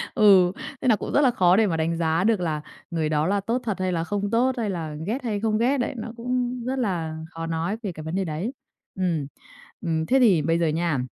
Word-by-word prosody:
Ừ, 195 -6 +6 0.3
thế - - -1
nà 225 - +6
cũng - - -5
rất 290 - +5
là 260 -3 +5
khó 180 -4 +4
để 215 0 +4
mà 165 - -1
đánh 165 +1 0
giá 165 +1 +1
được 220 -1 +3
là 155 -3 -1 0.3
người 160 -2 0
đó 155 +1 +1
là 200 +1 +1
tốt 235 +5 -1
thật 210 -5 -3
hay 185 0 0
là 165 -2 0
không 205 +3 -2
tốt 245 +3 +3
hay 220 -3 -1
là 160 -5 -4
ghét 255 +5 -2
hay 215 -4 -1
không 215 0 +1
ghét 255 +5 +2
đấy, 245 - -1
nó 225 0 -5
cũng 250 0 -2
rất 260 +1 -1
là 165 -8 -2
khó 165 0 -5
nói 165 +6 -2
về 200 - -2
cái 155 -2 -9
vấn 160 +3 -4
đề 190 0 0
đấy. 165 +8 -3 0.4
Ừm, 170 -7 -1 0.5
ừm 160 -2 -1
thế 265 +7 +3
thì 200 -10 +5
bây 165 +3 +1
giờ 165 - +2
nha, 160 -3 0
185 Hz, 255 wpm, -24 LUFS, 165-230 Hz, 0.5 s, Ừ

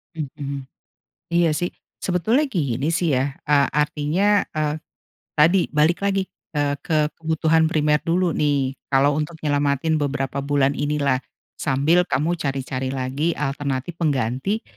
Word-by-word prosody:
Mhm. 140 -2 -5 0.7
Iya 170 -1 +3
sih, 175 +3 -1 0.3
sebetulnya 215 - +2
gini 145 - -1
sih 165 -3 +1
ya. 135 +2 0
Ah, 145 -1 +5
artinya, 150 +7 +2
ah, 155 -1 0 0.6
tadi 170 +5 +4
balik 155 +4 +2
lagi 195 -1 +1 0.3
ke 150 +1 0
kebutuhan 160 0 +2
primer 150 -2 +2
dulu 175 +1 +1
nih, 140 -4 +1 0.2
kalau 140 +2 +3
untuk 155 +2 -3
nyelamatin 145 +1 +1
beberapa 140 -1 -2
bulan 140 -1 +2
ini 145 +1 -1
lah. 135 -2 +2 0.4
Sambil 155 +6 +2
kamu 155 +6 0
cari-cari 135 -2 -2
lagi 135 +6 -1
alternatif 140 +3 -3
pengganti 140 - 0
150 Hz, 125 wpm, -22 LUFS, 140-165 Hz, 0.7 s, Ah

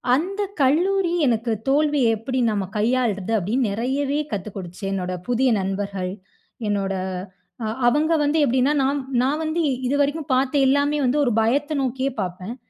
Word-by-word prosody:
அந்த 390 +7 -2 0.2
கல்லூரி 350 +6 +2
எனக்கு 230 -1 +1 0.2
"தோல்விய 285 -5 +3
எப்பிடி 255 +3 -2
நம்ம 200 -3 -2
கையாள்றது" 225 -3 0
அப்டின்னு 220 +5 0
நிறையவே 275 +6 -1
கத்துக் 200 +1 -5
கொடுத்துச்சு 180 +2 -7
என்னோட 185 -1 -2
புதிய 245 +1 +2
நண்பர்கள், 195 -1 -3 0.6
என்னோட 195 -1 0 0.7
அ - - -1 0.2
அவங்க 310 +5 +2
வந்து 300 +2 +2
எப்டின்னா 260 +4 +2
நான் 280 +1 0 0.2
நான் 295 +4 0
வந்து 320 +2 0 0.3
இதுவரைக்கும் 285 +1 0
பாத்த 260 +2 +1
எல்லாமே 285 +2 +2
வந்து 270 +4 +2
ஒரு 240 - +1
பயத்த 285 +7 +1
நோக்கியே 265 +2 -1
பாப்பேன். 185 +5 -5
255 Hz, 140 wpm, -22 LUFS, 210-290 Hz, 0.7 s, தோல்விய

